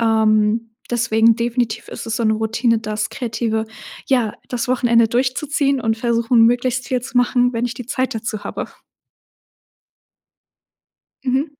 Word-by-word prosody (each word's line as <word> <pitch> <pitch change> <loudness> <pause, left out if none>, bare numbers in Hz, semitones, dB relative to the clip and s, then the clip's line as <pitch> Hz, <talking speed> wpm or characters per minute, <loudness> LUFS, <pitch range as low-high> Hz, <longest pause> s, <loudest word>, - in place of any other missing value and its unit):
Ähm, 220 0 +2 0.2
deswegen 230 -1 +3
definitiv 235 -1 -2
ist - - -7
es 225 - -2
so 230 - -1
'ne 220 - +3
Routine, 225 +1 +1
das 215 -1 -3
Kreative 225 -2 -2 0.4
ja, 245 -6 +1
das 245 -1 -2
Wochenende 235 -2 +3
durchzuziehen 270 +3 0
und 225 -1 0
versuchen, 235 0 +2
möglichst 245 +1 0
viel 250 -2 -1
zu 250 0 -7
machen, 245 0 +2
wenn 235 +1 -1
ich 240 - -5
die 250 -2 -8
Zeit 260 0 -1
dazu 215 -1 -4
habe. - - -4 2.6
Mhm. 280 +3 -1
235 Hz, 140 wpm, -19 LUFS, 225-250 Hz, 2.6 s, deswegen